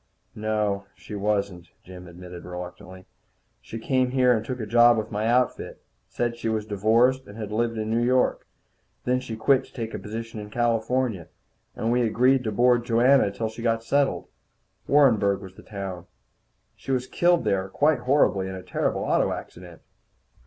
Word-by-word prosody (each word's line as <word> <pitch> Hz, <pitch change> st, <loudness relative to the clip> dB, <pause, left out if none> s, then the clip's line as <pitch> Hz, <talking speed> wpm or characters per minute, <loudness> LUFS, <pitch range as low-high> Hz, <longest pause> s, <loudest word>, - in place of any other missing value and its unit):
"No, 105 Hz, -2 st, -1 dB
she -, -, -11 dB
wasn't," 100 Hz, -4 st, -2 dB, 0.2 s
Jim 90 Hz, -1 st, -11 dB
admitted 90 Hz, 0 st, -10 dB
reluctantly. 90 Hz, +1 st, -9 dB, 0.6 s
"She 115 Hz, -, -8 dB
came 130 Hz, +2 st, +1 dB
here 125 Hz, -1 st, +3 dB
and 110 Hz, -, -2 dB
took 125 Hz, +2 st, -5 dB
a 110 Hz, -, -3 dB
job 120 Hz, +2 st, +5 dB
with 110 Hz, +1 st, -3 dB
my 105 Hz, +1 st, -1 dB
outfit. 125 Hz, +2 st, 0 dB, 0.3 s
Said 120 Hz, -1 st, -2 dB
she 115 Hz, -, -3 dB
was 110 Hz, -1 st, -1 dB
divorced, 115 Hz, +6 st, +2 dB
and 100 Hz, -, -11 dB
had 105 Hz, -2 st, -6 dB
lived 115 Hz, +1 st, -1 dB
in 110 Hz, 0 st, -3 dB
New 115 Hz, +1 st, +1 dB
York. 125 Hz, +1 st, +1 dB, 0.6 s
Then 125 Hz, 0 st, +1 dB
she 130 Hz, -3 st, -6 dB
quit 130 Hz, +4 st, +3 dB
to -, -, -21 dB
take 115 Hz, -2 st, -5 dB
a -, -, -4 dB
position 115 Hz, +1 st, -7 dB
in 105 Hz, 0 st, -8 dB
California, 120 Hz, -3 st, 0 dB, 0.5 s
and 115 Hz, -, -1 dB
we 125 Hz, +1 st, +2 dB
agreed 125 Hz, +3 st, +3 dB
to 110 Hz, -, -1 dB
board 120 Hz, +2 st, +3 dB
Joanna 125 Hz, +4 st, +4 dB
until 105 Hz, +3 st, -3 dB
she 110 Hz, +1 st, -8 dB
got 115 Hz, -1 st, 0 dB
settled. 140 Hz, +4 st, 0 dB, 0.6 s
Warrenburg 110 Hz, -9 st, +4 dB
was 95 Hz, -2 st, -11 dB
the -, -, -14 dB
town. 95 Hz, -4 st, -7 dB, 0.7 s
She -, -, -7 dB
was 130 Hz, -1 st, 0 dB
killed 175 Hz, +4 st, +2 dB
there 95 Hz, -1 st, 0 dB
quite 145 Hz, +6 st, +2 dB
horribly, 120 Hz, -7 st, +2 dB
in 95 Hz, -, -6 dB
a 95 Hz, -, -8 dB
terrible -, -, -1 dB
auto -, -, +1 dB
accident." 90 Hz, -1 st, -9 dB
110 Hz, 175 wpm, -25 LUFS, 100-125 Hz, 0.7 s, job